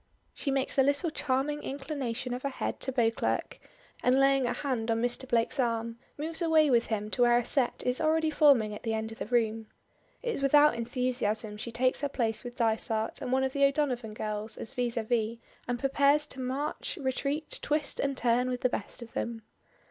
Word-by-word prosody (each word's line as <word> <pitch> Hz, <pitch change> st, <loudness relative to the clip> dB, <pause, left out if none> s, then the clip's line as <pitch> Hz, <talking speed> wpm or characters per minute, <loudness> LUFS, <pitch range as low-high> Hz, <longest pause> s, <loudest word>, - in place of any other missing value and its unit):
She -, -, -4 dB
makes 270 Hz, 0 st, 0 dB
a -, -, +8 dB
little 285 Hz, +5 st, +1 dB
charming 295 Hz, +1 st, -1 dB
inclination 270 Hz, -3 st, -4 dB
of 250 Hz, -, -4 dB
her 280 Hz, -, -1 dB
head 265 Hz, -, -4 dB
to 265 Hz, -, -2 dB
Beauclerk, 230 Hz, -3 st, 0 dB, 0.4 s
and 255 Hz, +2 st, +3 dB
laying 275 Hz, -1 st, +4 dB
her 245 Hz, -, 0 dB
hand 250 Hz, -6 st, -2 dB
on 225 Hz, 0 st, +1 dB
Mr. 245 Hz, +2 st, 0 dB
Blake's 235 Hz, +4 st, +1 dB
arm, 230 Hz, -1 st, -1 dB, 0.2 s
moves 320 Hz, +3 st, -2 dB
away 315 Hz, -3 st, +4 dB
with 235 Hz, -1 st, +3 dB
him 215 Hz, -1 st, -3 dB
to 245 Hz, -, -1 dB
where 240 Hz, 0 st, +5 dB
a 240 Hz, -, 0 dB
set 265 Hz, -4 st, +1 dB
is 250 Hz, +3 st, +1 dB
already 315 Hz, 0 st, +2 dB
forming 275 Hz, -9 st, +4 dB
at 210 Hz, -, -8 dB
the 225 Hz, -1 st, -1 dB
end 220 Hz, 0 st, -3 dB
of 225 Hz, -, -10 dB
the -, -, -4 dB
room. 225 Hz, -2 st, 0 dB, 0.6 s
It 475 Hz, -2 st, -1 dB
is -, -, -4 dB
without 295 Hz, +2 st, +5 dB
enthusiasm 235 Hz, -3 st, -1 dB
she 235 Hz, +2 st, -5 dB
takes 255 Hz, +2 st, +1 dB
her 285 Hz, -, -1 dB
place 225 Hz, -5 st, -1 dB
with 245 Hz, -1 st, -7 dB
Dysart 225 Hz, -2 st, 0 dB
and 250 Hz, -, -3 dB
one 265 Hz, +1 st, +2 dB
of 265 Hz, 0 st, -1 dB
the 280 Hz, -, +1 dB
O'Donovan 265 Hz, -6 st, +1 dB
girls 215 Hz, 0 st, -3 dB
as -, -, -6 dB
vis 245 Hz, -2 st, -1 dB
à 230 Hz, -2 st, -2 dB
vis, 230 Hz, 0 st, 0 dB, 0.3 s
and 245 Hz, 0 st, -1 dB
prepares 280 Hz, +3 st, +3 dB
to 270 Hz, -, -7 dB
march, 285 Hz, -, -3 dB
retreat, 275 Hz, +3 st, -2 dB
twist 295 Hz, -1 st, -1 dB
and 275 Hz, -1 st, -1 dB
turn 245 Hz, +1 st, +2 dB
with 250 Hz, -1 st, -3 dB
the 255 Hz, -, +2 dB
best 220 Hz, +1 st, -4 dB
of 230 Hz, -, -14 dB
them. 230 Hz, -1 st, -4 dB
250 Hz, 210 wpm, -29 LUFS, 230-280 Hz, 0.6 s, a